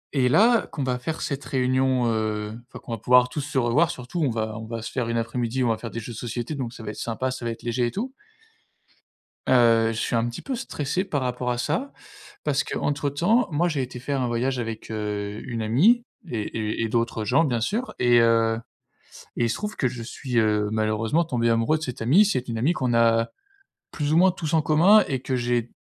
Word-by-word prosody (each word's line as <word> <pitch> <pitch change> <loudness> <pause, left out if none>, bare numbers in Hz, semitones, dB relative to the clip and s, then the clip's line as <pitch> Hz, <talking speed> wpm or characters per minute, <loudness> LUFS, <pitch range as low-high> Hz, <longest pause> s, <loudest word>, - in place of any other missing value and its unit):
Et 130 -2 +3
là, 230 - +4
qu'on 145 - -3
va 125 -1 -1
faire 155 +6 -4
cette 140 -1 -3
réunion, 130 -1 +1
heu, 105 -1 -2
enfin, - - -11
qu'on - - -9
va 115 - -3
pouvoir 125 +3 +5
tous 150 - -3
se 145 +1 -4
revoir 130 +7 +3
surtout, 170 +2 -5
on 140 - +2
va 110 -2 -2
on 110 - -8
va 115 -1 -5
se - - -6
faire 125 -3 -2
une 115 - 0
après-midi, 120 +2 -1
on 120 - +2
va 110 - +1
faire 115 - -6
des 115 - -5
jeux 115 +1 -7
de - - -9
société 120 +4 -4
donc 130 -5 -4
ça 115 - -11
va 105 - -4
être - - -11
sympa, 130 +3 -2
ça 130 -2 -6
va - - 0
être 115 - -9
léger 120 +1 0
et - - -3
tout. 250 +6 -4 1.4
Heu, 115 -3 +5
je 115 - -5
suis - - -1
un 115 +1 +1
petit 120 - -7
peu 270 - -3
stressé 170 - -2
par 160 -8 -2
rapport 125 0 -2
à 120 - -1
ça 265 - -2 0.5
parce 145 -2 +1
qu'entre 145 0 -1
temps, 190 - +2
moi 165 +4 +2
j'ai 155 -5 -1
été 125 -1 -6
faire 135 +2 -2
un 125 - 0
voyage 125 +2 -1
avec, 115 -2 -5
heu, 105 -1 -3
une 115 -3 -4
amie 185 - +4 0.2
et 115 -6 -2 0.2
et 110 0 -2
et - - 0
d'autres 115 -1 -1
gens 130 +9 +3
bien 125 -7 0
sûr 215 - -2
et 120 -1 +5
heu, 115 -1 +3 0.8
et 120 - +1
il 115 - +1
se - - 0
trouve 210 0 -5
que 130 - 0
je 120 -1 -3
suis, 125 +1 -3
heu, 105 -2 +2
malheureusement 110 +8 +1
tombé 120 -6 0
amoureux 115 +7 +2
de - - -11
cette 125 -4 -5
amie. 150 - +5
C'est 130 -11 -1
une 115 -1 -3
amie 135 +9 +2
qu'on 130 -8 -1
a 115 0 +3 0.6
plus 150 -1 -2
ou - - +4
moins 185 +2 +6
tous 165 -3 -4
en 160 - +4
commun 175 +8 +5
et 130 -3 -2
que 130 0 -2
j'ai 120 -1 -1
125 Hz, 240 wpm, -24 LUFS, 115-145 Hz, 1.4 s, moins